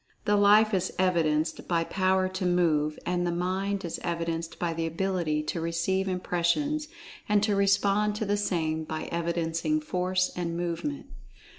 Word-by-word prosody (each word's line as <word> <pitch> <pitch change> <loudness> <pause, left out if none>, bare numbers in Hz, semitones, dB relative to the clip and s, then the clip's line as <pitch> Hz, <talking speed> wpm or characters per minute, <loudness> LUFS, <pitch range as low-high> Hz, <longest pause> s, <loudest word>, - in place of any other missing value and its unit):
The 205 - +3
Life 210 +2 +5
is 185 -2 0
evidenced 160 -4 +1
by 170 -2 +1
power 185 +1 +1
to 185 0 -4
move, 160 -4 +2
and 175 0 0
the 175 - 0
Mind 190 +3 -1
is 170 - -4
evidenced 165 -1 -3
by 170 -1 -1
the 165 0 -2
ability 165 -3 -1
to 165 +2 -3
receive 170 +4 0
impressions 185 - 0 0.4
and 210 -1 +3
to 210 -1 +2
respond 200 +1 +2
to 215 - -2
the 205 0 +1
same 160 -6 -1
by 155 0 -4
evidencing 170 - 0
Force 185 -9 0
and 170 -1 -3
movement. 175 - -3
180 Hz, 155 wpm, -28 LUFS, 165-200 Hz, 0.4 s, Life